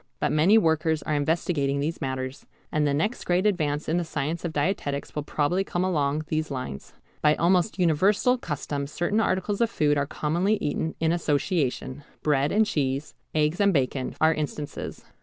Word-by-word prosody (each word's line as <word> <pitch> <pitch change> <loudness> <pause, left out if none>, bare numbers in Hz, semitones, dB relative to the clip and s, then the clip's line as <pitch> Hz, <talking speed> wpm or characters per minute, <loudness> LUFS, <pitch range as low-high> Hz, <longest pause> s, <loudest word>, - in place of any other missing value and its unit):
But - - +1
many 170 +8 +5
workers 160 -4 +2
are 155 - -2
investigating 145 -2 0
these 155 +4 -2
matters, 130 0 -4 0.2
and 150 -1 +1
the - - +2
next 205 +11 -1
great 180 +2 +1
advance 155 -7 0
in 165 - +1
the 175 - +1
science 155 +1 -3
of 170 - -2
dietetics 145 -2 -2
will 150 - -2
probably 150 +5 0
come 180 -2 -2
along 150 -4 0
these 155 0 -1
lines. 125 - -6 0.3
By 150 0 +4
almost 180 +4 +2
universal 195 +9 +3
custom 145 - -3
certain 175 +8 0
articles 200 0 0
of 230 - +3
food 145 -8 +2
are 140 - -1
commonly 175 +10 0
eaten 160 -3 -2
in 160 0 +2
association: 145 -4 -1 0.2
bread 145 -1 +2
and 215 +2 +4
cheese, 140 -5 -1 0.2
eggs 155 +4 +1
and 200 0 +5
bacon, 130 -4 -1
are 160 +1 +5
instances. 150 -1 -5
155 Hz, 175 wpm, -26 LUFS, 145-180 Hz, 0.3 s, many